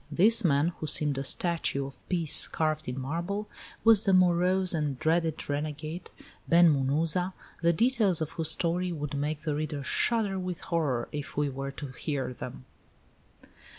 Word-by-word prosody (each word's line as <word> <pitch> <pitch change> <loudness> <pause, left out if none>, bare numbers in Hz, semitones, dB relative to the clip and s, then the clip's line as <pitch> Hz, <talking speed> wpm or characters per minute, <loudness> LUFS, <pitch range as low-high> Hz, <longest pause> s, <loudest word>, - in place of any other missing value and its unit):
This 220 +6 +5
man, 150 -1 +3
who 155 - -4
seemed 150 -2 +2
a - - -3
statue 160 -2 0
of 135 - -9
Peace 170 -5 +3
carved 155 -1 -2
in 125 +2 -4
marble, 170 +10 -3 0.4
was 225 -2 +6
the 195 -2 +3
morose 180 +1 +3
and 150 -5 -1
dreaded 160 +1 0
renegade, 155 +3 -4 0.4
Ben 170 -1 +6
Munuza, 155 +7 0 0.3
the 170 0 +4
details 220 -2 +2
of 155 -2 -3
whose 160 -2 0
story 175 +2 0
would 150 -3 -5
make 145 +2 -2
the 155 -2 -2
reader 150 -1 -3
shudder 205 - 0
with 180 -2 -4
horror, 145 -8 -1
if 145 -2 -6
he 145 0 0
were 135 +1 -5
to 140 0 -7
hear 130 -1 -4
them. 65 - -9
160 Hz, 160 wpm, -28 LUFS, 145-180 Hz, 0.4 s, was